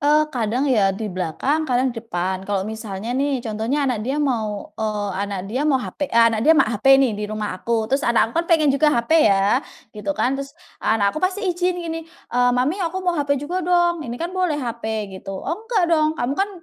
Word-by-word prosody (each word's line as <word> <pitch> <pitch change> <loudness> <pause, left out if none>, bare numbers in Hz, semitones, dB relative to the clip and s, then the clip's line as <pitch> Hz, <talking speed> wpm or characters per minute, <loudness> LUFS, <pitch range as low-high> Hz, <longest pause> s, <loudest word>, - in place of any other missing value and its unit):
Eee, 300 +1 +4
kadang 240 +2 0
ya 200 -8 +2
di 210 -3 -4
belakang, 260 - -1
kadang 250 0 +1
di 230 - -6
depan. 185 -3 -3
Kalau 195 -2 0
misalnya 220 0 -5
nih 275 +1 0
contohnya 225 +6 -1
anak 250 -5 0
dia 260 +6 -2
mau, 220 -8 -2
eee, 210 -1 -2
anak 200 -1 -3
dia 225 +7 -3
mau 275 - +4
HP 280 +2 -4
eee, - - -3 0.2
anak 220 - -1
dia 315 +6 +5
me 275 - +6
HP 240 +5 +4
nih 265 -5 +3
di 210 0 -4
rumah 215 -1 -3
aku, 225 +4 -1
terus 270 +5 0
anak 230 -1 +2
aku 335 - +2
kan 340 - -8
pengen 310 -4 +4
juga 300 +2 +3
HP 295 0 +3
ya, 200 +5 +3 0.3
gitu 230 +8 -4
kan, 255 - +1
terus 275 +3 -9 0.2
anak 205 -2 +2
aku 310 - -4
pasti 375 +3 -1
ijin 360 0 0
gini, 330 -2 -4
eee, 245 -7 -1
"Mami 295 +10 0
aku 345 +1 -2
mau 355 - +2
HP 285 -3 0
juga 360 +5 -2
dong, 345 -1 +2
ini 240 -5 -5
kan 340 +6 -4
boleh 365 -5 0
HP," 220 -5 -4
gitu. 195 0 -6
"Oh 295 - -4 0.2
enggak 415 -7 +2
dong, 310 0 +2
kamu 245 +2 -1
kan 390 +7 0
255 Hz, 225 wpm, -21 LUFS, 215-310 Hz, 0.3 s, me